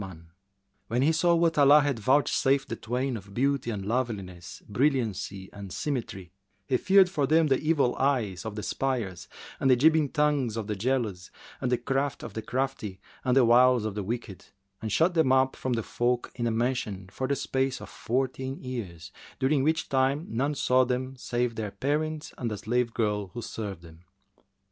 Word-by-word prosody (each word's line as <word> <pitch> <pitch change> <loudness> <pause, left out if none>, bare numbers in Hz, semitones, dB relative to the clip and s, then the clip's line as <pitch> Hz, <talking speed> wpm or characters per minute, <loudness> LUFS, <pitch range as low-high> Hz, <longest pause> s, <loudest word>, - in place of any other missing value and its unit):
[FN#376] 90 -4 -9 0.6
When 120 +3 0
he 155 - +4
saw 170 +1 +3
what 165 -2 +2
Allah 145 +1 +7
had 140 -5 -1
vouchsafed 135 +2 +2
the 115 - -2
twain 125 +4 -2
of 100 -2 -10
beauty 135 0 +1
and 100 -4 -4
loveliness, 100 -7 -4
brilliancy 110 -6 -1
and 100 -2 -9
symmetry, 105 - -4 0.3
he 130 - +1
feared 190 +5 +5
for 150 -7 -1
them 160 +3 +4
the 135 - +3
evil 155 -5 +2
eyes[FN#377] 120 -9 0
of 110 -2 -5
the 105 - -4
espiers 120 -10 -2 0.3
and 135 - +2
the 130 - +7
jibing 155 +2 +4
tongues 145 -7 +1
of 110 - -3
the 105 0 -3
jealous 105 -4 -1 0.3
and 125 - -1
the 125 - +3
craft 135 +3 -2
of 110 - -7
the 110 - -4
crafty 125 -7 -3 0.2
and 130 +1 +2
the 130 - +6
wiles 125 0 +5
of 110 - -2
the 105 - -3
wicked 105 -2 -5 0.4
and 110 - -4
shut 165 - +3
them 160 -6 +3
up 130 0 +3
from 130 - -2
the 115 -1 -1
folk 120 +2 -1
in 120 -1 -2
a - - +1
mansion 110 -5 -2
for 130 - -3
the 140 - +1
space 135 -1 -1
of - - -9
fourteen 130 +2 -2
years, 95 -9 -6 0.3
during 135 +1 +2
which 160 +3 +1
time 135 +3 +1
none 135 +6 -1
saw 130 -1 +3
them 130 +1 -2
save 120 -1 -1
their 110 -2 -4
parents 150 +8 -2
and 120 -3 -2
a 105 - -3
slave 120 +3 0
girl 105 -3 -1
who 120 - -4
served 100 -6 -6
them. 80 0 -15
125 Hz, 190 wpm, -27 LUFS, 110-135 Hz, 0.6 s, Allah